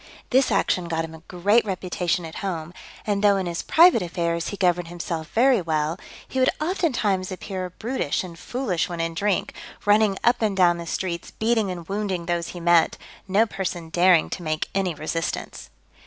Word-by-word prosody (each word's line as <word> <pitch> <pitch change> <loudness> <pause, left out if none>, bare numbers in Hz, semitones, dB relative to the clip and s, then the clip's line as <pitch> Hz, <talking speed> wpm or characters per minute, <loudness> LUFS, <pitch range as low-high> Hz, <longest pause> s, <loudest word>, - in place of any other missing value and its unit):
This 260 -1 +4
action 180 -3 +1
got 165 -1 -1
him 160 - -11
a 160 - -12
great 205 +6 +3
reputation 180 -3 -2
at 160 - -8
home; 175 -4 -4 0.3
and 205 -1 0
though 200 -1 +5
in 190 - -1
his 170 -1 -3
private 335 - +5
affairs 170 -1 -2
he 200 - -5
governed 175 -2 +1
himself 165 -2 -5
very 245 -1 +4
well, 160 +1 -1 0.3
he 260 - -3
would 255 - +4
oftentimes 250 - 0
appear 185 0 -5
brutish 220 - -2
and 170 -3 -10
foolish 230 -11 -2
when 170 -1 -5
in 165 0 -1
drink, 200 +3 0 0.3
running 205 -1 +4
up 240 0 +3
and 210 -3 0
down 175 -2 +4
the 170 - -7
streets, 170 -2 -3
beating 220 -2 0
and 175 -3 -6
wounding 195 -4 -2
those 170 -1 -1
he 175 - -7
met, 170 -1 +3 0.3
no 200 +4 +4
person 180 -5 -4
daring 175 0 +4
to - - -4
make 155 -2 -2
any 190 -4 0
resistance. 155 - -4
180 Hz, 185 wpm, -24 LUFS, 170-205 Hz, 0.3 s, though